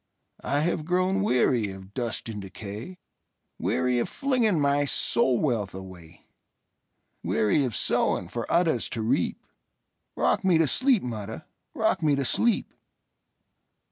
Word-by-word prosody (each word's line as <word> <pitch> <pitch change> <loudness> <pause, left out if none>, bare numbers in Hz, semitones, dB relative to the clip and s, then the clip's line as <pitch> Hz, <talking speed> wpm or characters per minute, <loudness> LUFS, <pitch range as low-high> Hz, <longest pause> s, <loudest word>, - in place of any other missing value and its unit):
I 145 +1 0
have 160 -1 0
grown 185 +3 +1
weary 125 - +2
of 95 +1 -11
dust 120 -2 -3
and 105 -2 -5
decay,—Weary 115 - -5
of - - -1
flinging 245 - +1
my 140 0 +2
soul 130 -2 +2
wealth 115 -10 -1
away; 90 -4 -12 1.0
Weary 110 +7 +1
of 120 - -3
sowing 90 - +1
for 115 +5 -5
others 165 -8 +2
to 110 - -2
reap;—Rock 110 - -3
me 185 -3 +4
to 160 - +4
sleep, 255 - +3
mother,—rock 110 -3 -4
me 150 -2 +3
to 140 -1 -1
sleep! 235 - +1
125 Hz, 120 wpm, -26 LUFS, 105-165 Hz, 1.0 s, me